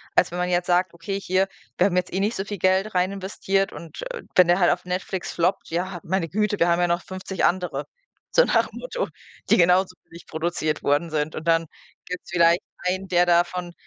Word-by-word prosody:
als 175 - +4
wenn 175 - -4
man 180 0 0
jetzt 175 0 +1
sagt: 180 0 +2
„Okay, 195 +4 -4
hier, 190 0 +1 0.3
wir 180 - +4
haben 185 -3 +1
jetzt 180 - 0
eh 190 - 0
nicht 210 +4 0
so 195 - -3
viel 205 0 -5
Geld 190 +3 +1
rein 180 +2 +2
investiert 195 0 -1
und, 170 - -9
äh, 485 - -7
wenn 180 -2 +7
der 175 +1 +4
halt 175 - +5
auf 180 0 -2
Netflix 180 0 -3
floppt, 180 +3 0
ja, 175 +2 -2
meine 185 -1 -1
Güte, 210 0 0
wir 170 - +3
haben 170 0 +3
ja 175 - +3
noch 170 0 0
50 185 0 -3
andere", 180 0 0 0.5
so - - +6
nach - - +2
dem - - -10
Motto, - - -3 0.4
die - - +7
genauso 180 +1 +4
billig 170 +1 -14
produziert 160 -1 -2
worden 145 +4 +1
sind. 150 0 -1
Und 160 +2 -6
dann 165 -1 +3 0.4
gibt 180 0 -6
es - - -14
vielleicht 170 0 +4 0.3
einen, 190 +1 -1
der 175 0 +3
davon 175 0 +1
180 Hz, 225 wpm, -24 LUFS, 170-190 Hz, 0.5 s, wenn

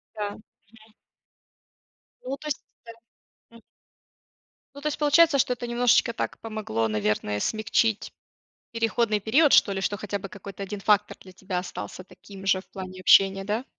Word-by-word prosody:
Да. 205 -1 -3
Мгм. 210 - -12 1.8
Ну, 265 +2 -4
то 305 - -12
есть 290 - -3 0.2
да. 230 - -10 0.6
М. 230 - -16 1.1
Ну, 285 - -9
то 300 - -1
есть, 300 - -4
получается, 300 0 +5
что 250 - +2
это 240 0 -5
немножечко 240 0 +3
так - - -4
помогло, 215 - -2
наверное, 105 -1 -1
смягчить 215 - 0 0.6
переходный 230 -1 0
период, 275 +9 +3
что 200 - +6
ли, 190 -1 -3
что 205 +1 -1
хотя 200 0 -4
бы 195 - -8
какой-то 200 0 -10
1 200 +1 -5
фактор 210 +1 +2
для 185 - -14
тебя 185 0 -5
остался 180 - -6
таким 195 +1 -13
же 190 -1 +2
в - - -28
плане 185 -1 -8
общения, 195 +1 +5
да? 215 +5 -2
205 Hz, 160 wpm, -25 LUFS, 190-235 Hz, 1.8 s, что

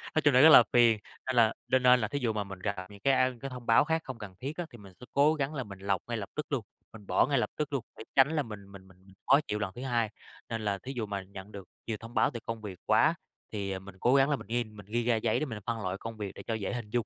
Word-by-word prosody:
Nói 155 - +4
chung 145 - +5
là 130 - +7
rất 160 - +9
là 125 - +10
phiền, 115 -3 +5 0.3
nên 130 - -1
là 115 -2 +5
nên 130 0 +2
nên 125 0 +7
là 105 - 0
thí 145 - -3
dụ 120 -4 0
mà 105 -1 -1
mình 95 -1 -9
gặp 100 +2 -2
những 100 -1 -13
cái, 135 +6 +3
a, 130 0 +3
cái 135 - -4
thông 125 -2 -9
báo 115 - +5
khác 160 +1 0
không 130 -3 -6
cần 105 -4 -9
thiết 140 +7 -5
á, 175 - -2
thì 120 - -11
mình 100 -3 -14
sẽ 125 - -11
cố 145 +3 +5
gắng 145 -1 -2
là 135 -4 -3
mình 100 -4 -11
lọc 100 -1 0
ngay 120 -1 -2
lập 105 -1 -5
tức 150 - -2
luôn, 130 -6 -1 0.3
mình 105 -3 -13
bỏ - - +4
ngay 140 0 +1
lập 120 - +1
tức 150 -1 -2
luôn 135 -5 -1
để - - -8
tránh 135 +2 +6
là 150 - +1
mình 100 -4 -10
mình 95 -1 -13
mình 95 -1 -19 0.3
khó 140 +2 +7
chịu 105 - -2
lần 105 -2 -2
thứ 120 - -7
hai. 120 -4 0 0.4
Nên 115 -1 -3
là 100 -1 0
thí 130 +7 -7
dụ 115 -3 -2
mà 100 -1 -4
nhận 95 +1 -11
được 100 -3 -9 0.2
nhiều 110 -2 -2
thông 115 +1 -10
báo - - +3
từ 120 - -4
công 115 -1 -4
việc 100 -4 -8
quá, - - +4 0.4
thì, 100 -2 -3
à, 95 - -3
mình 95 0 -12
cố 125 +6 +3
gắng 135 +1 +5
là 145 - +3
mình - - -10
nên 115 -2 -2
mình 100 - -11
ghi 120 +2 0
ra 120 -1 +3
giấy 110 0 +1
để - - -1
mình 115 -7 -6
phân 115 -2 -2
loại 95 0 -2
công 115 -1 -7
việc 105 -2 -4
để - - -9
cho 115 - -1
dễ 110 -1 -3
hình 120 -4 -5
dung. 120 0 0
115 Hz, 325 wpm, -30 LUFS, 100-130 Hz, 0.4 s, là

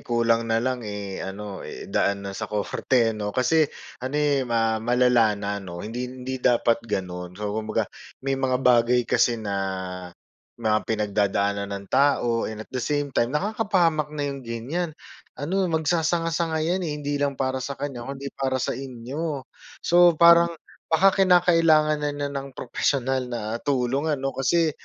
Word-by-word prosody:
kulang 115 -1 +1
na 115 - +2
lang, 125 +2 0
eh, 105 -3 -5
ano, 95 0 -6
i-daan 100 0 -2
na 100 - -4
sa 110 +2 -5
korte 115 +3 +1
'no. 105 -1 -4
Kasi 150 +7 +2 0.3
ano 130 +3 -3
eh, 145 -2 +2
ma 115 -1 +1
malala 120 -2 +3
na 100 0 -3
'no. 85 -2 -7
Hindi 120 +3 -4
hindi 130 +1 -6
dapat 120 -1 +3
gano’n. 90 -2 -4
So 105 -1 -3
kumbaga, 110 0 -1 0.4
may 135 0 -1
mga 130 -1 +2
bagay 125 0 +4
kasi 120 0 +2
na 105 -3 -4 1.0
mga 110 -2 +2
pinagdadaanan 100 -1 0
ng 100 0 -9
tao 130 -4 +2
and 110 0 -6
at - - -36
the 130 - -2
same 145 +1 -1
time, 120 -1 +2
nakakapahamak 175 - +1
na 145 - -1
yung 140 - -7
ganiyan. 135 +8 -4 0.4
Ano, 185 +7 0
magsasanga-sanga 165 0 0
‘yan 180 +3 0
eh. 155 -5 -3
Hindi 145 -1 -3
lang 140 -1 0
para 130 0 -1
sa 135 +2 -4
kaniya, 140 -4 -5
kung 140 - -4
‘di 140 +1 -7
para 130 -1 -1
sa 130 - -1
inyo. 135 +3 -5 0.4
So 175 -1 +6
parang 170 0 +6 0.3
baka 185 +4 +5
kinakailangan 165 -4 +4
na 145 0 0
niya 145 0 -2
ng 140 -1 -6
propesyonal 130 +1 -1
na 120 -1 -3 0.2
tulong 135 +1 0
ano 135 -1 -2
kasi 160 +4 +2
130 Hz, 160 wpm, -24 LUFS, 115-150 Hz, 1.0 s, So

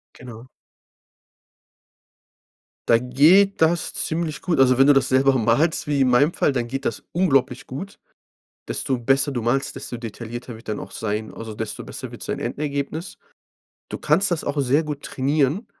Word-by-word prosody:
Genau. 120 0 -11 2.4
Da 115 - +6
geht 160 +11 +4
das 165 +1 +2
ziemlich 160 -1 -2
gut. 165 -6 0
Also, 130 -1 +5
wenn 135 +1 +5
du 145 - +7
das 135 -1 +2
selber 135 0 +3
malst 120 +10 +1
wie 145 -2 +1
in 130 - +3
meinem 145 +7 +3
Fall, 140 - +2
dann 120 -2 -2
geht 135 +2 -4
das - - -2
unglaublich 135 -8 +1
gut. 185 +10 -8 0.7
Desto 130 - -1
besser 135 +4 +1
du 120 - -2
malst, 120 +4 0
desto 120 - -6
detaillierter 115 +1 -7
wird 110 - -12
er 105 - -1
dann - - -6
auch 95 - -19
sein, 110 +1 -4
also, 110 -1 -7
desto 110 0 -5
besser - - -8
wird - - -9
sein - - -3
Endergebnis. 145 +4 -4 0.7
Du - - -6
kannst 200 -1 +2
das 170 - -1
auch 145 0 -1
sehr 140 +4 +2
gut 150 -2 -5
trainieren 145 - 0
135 Hz, 170 wpm, -22 LUFS, 120-150 Hz, 2.4 s, du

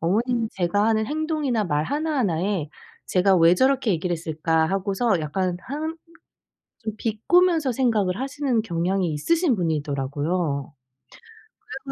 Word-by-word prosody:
어머니는 225 +6 0
제가 190 +3 +1
하는 220 -1 +2
행동이나 300 -6 -1
말 150 -4 0
하나하나에 205 - -1 0.4
'쟤가 190 +1 +3
왜 165 0 +6
저렇게 260 +2 +2
얘기를 175 +1 -1
했을까?' 160 0 0
하고서 195 +2 0
약간 175 +4 -1
한 310 +4 -4 0.9
좀 220 -1 -4
비꼬면서 310 - +2
생각을 220 -6 +1
하시는 270 -4 -1
경향이 180 -1 -1
있으신 320 - +1
분이더라고요. 145 -1 -2 0.9
그래 275 -9 -9
200 Hz, 305 characters per minute, -24 LUFS, 165-260 Hz, 0.9 s, 왜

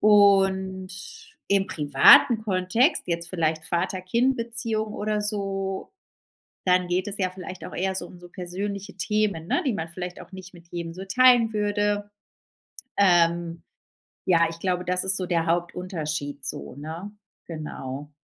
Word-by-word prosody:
Und 195 -2 +4 0.6
im 195 0 +2
privaten 145 - +6
Kontext 205 - +1
jetzt 170 -1 -2
vielleicht 160 -3 -1
Vater-Kind-Beziehung 220 +5 -1
oder 210 0 -1
so 195 - -3 0.7
dann 180 -1 +3
geht 180 +3 -1
es 205 - -2
ja 185 -2 0
vielleicht 185 0 -8
auch - - -9
eher 190 +1 -1
so - - -3
um 180 - -14
so 175 0 -13
persönliche 200 +2 -5
Themen 200 -4 -1
ne, - - +1
die 255 - +1
man 165 -3 -4
vielleicht 180 +1 -6
auch - - -15
nicht 185 0 -10
mit 170 -1 -16
jedem 170 -1 -5
so 190 +2 -8
teilen 240 +1 +5
würde. 205 0 0 0.9
Ähm, 170 -3 +3 0.6
ja, 170 -2 +4
ich 165 0 -10
glaube, 180 -1 -1
das 180 +1 0
ist 190 0 +4
so 185 - -1
der 170 -2 0
Hauptunterschied 165 -5 -3
so, 70 - -5
ne? 160 +7 -7 0.4
Genau. 150 -3 -7
185 Hz, 145 wpm, -25 LUFS, 170-205 Hz, 0.9 s, privaten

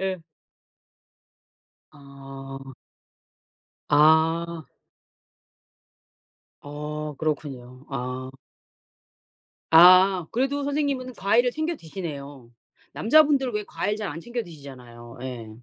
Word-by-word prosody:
예. 190 -2 -2 1.7
아. 135 -1 -11 1.2
아. 160 +1 +3 2.0
어 150 +1 -6
그렇군요. 135 -4 -4
아. 130 -1 -5 1.4
아 180 +1 +7
그래도 270 +4 0
선생님은 280 -3 -2
과일을 235 +5 +2
챙겨 315 +1 -2
드시네요. 145 - -8 0.4
남자분들 280 -1 +3
왜 210 0 -3
과일 205 +1 -3
잘 215 -1 -4
안 155 +3 -6
챙겨 240 +4 -4
드시잖아요. 125 - -12
예. 120 -4 -7
160 Hz, 165 characters per minute, -24 LUFS, 135-210 Hz, 2.0 s, 아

